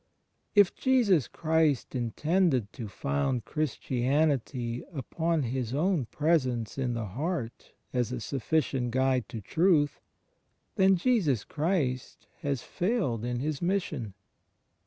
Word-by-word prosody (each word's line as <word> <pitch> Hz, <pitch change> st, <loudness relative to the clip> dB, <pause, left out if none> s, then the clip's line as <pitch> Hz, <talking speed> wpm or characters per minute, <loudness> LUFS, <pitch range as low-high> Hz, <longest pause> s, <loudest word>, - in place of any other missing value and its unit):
If 205 Hz, -3 st, +6 dB
Jesus 225 Hz, -, +3 dB
Christ 160 Hz, -4 st, +1 dB
intended 130 Hz, -, +1 dB
to 115 Hz, -5 st, -6 dB
found 95 Hz, -, -1 dB
Chris 155 Hz, -3 st, -1 dB
tianity 130 Hz, -2 st, 0 dB
upon 160 Hz, +2 st, -1 dB
His 125 Hz, 0 st, -2 dB
own 165 Hz, -2 st, +1 dB
Presence 130 Hz, -9 st, 0 dB
in 125 Hz, -2 st, 0 dB
the 115 Hz, -2 st, -2 dB
heart 130 Hz, -, -4 dB, 0.2 s
as 125 Hz, -2 st, 0 dB
a 125 Hz, -, -3 dB
sufficient 135 Hz, 0 st, -1 dB
guide 130 Hz, 0 st, +1 dB
to 110 Hz, -, -6 dB
truth 155 Hz, -, +2 dB, 0.4 s
— -, -, -46 dB
then 190 Hz, 0 st, +5 dB
Jesus 175 Hz, -, +2 dB
Christ 145 Hz, -6 st, -2 dB
has 140 Hz, -4 st, -2 dB
failed 175 Hz, -, -1 dB
in 120 Hz, 0 st, -2 dB
His 150 Hz, 0 st, -2 dB
Mission. 160 Hz, -, -1 dB
135 Hz, 120 wpm, -29 LUFS, 120-165 Hz, 0.4 s, If